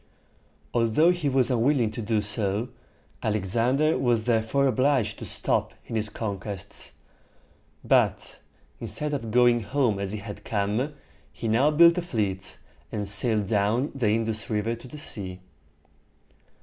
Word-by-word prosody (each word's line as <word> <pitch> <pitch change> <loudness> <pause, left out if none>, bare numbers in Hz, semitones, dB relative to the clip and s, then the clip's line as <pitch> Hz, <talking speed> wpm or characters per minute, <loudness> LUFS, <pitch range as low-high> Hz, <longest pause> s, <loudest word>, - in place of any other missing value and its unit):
Although 120 +9 +3
he 175 -5 -1
was 130 -1 +2
unwilling 120 -1 +2
to 115 - -5
do 110 0 0
so, 105 +2 0 0.5
Alexander 120 - +1
was 120 -4 +1
therefore 120 +4 +1
obliged 130 -3 +1
to - - -6
stop - - 0
in 115 - -6
his 110 -1 0
conquests; 100 -3 -6 0.9
but, - - +1 0.4
instead 150 +7 -4
of 115 -6 -3
going 120 +1 +4
home 115 -1 0
as 100 -1 -3
he 110 - -4
had 100 0 -9
come, 110 +8 -1 0.4
he 115 - -6
now 120 +7 +3
built 170 +3 +6
a - - -2
fleet, 105 - -3 0.3
and 105 -2 -3
sailed 105 +1 +4
down 105 +6 0
the 130 -5 -1
In´dus 110 0 0
River 110 +1 -1
to 115 +2 -10
the 150 - -10
sea. 95 -10 -3
115 Hz, 140 wpm, -26 LUFS, 105-130 Hz, 0.9 s, built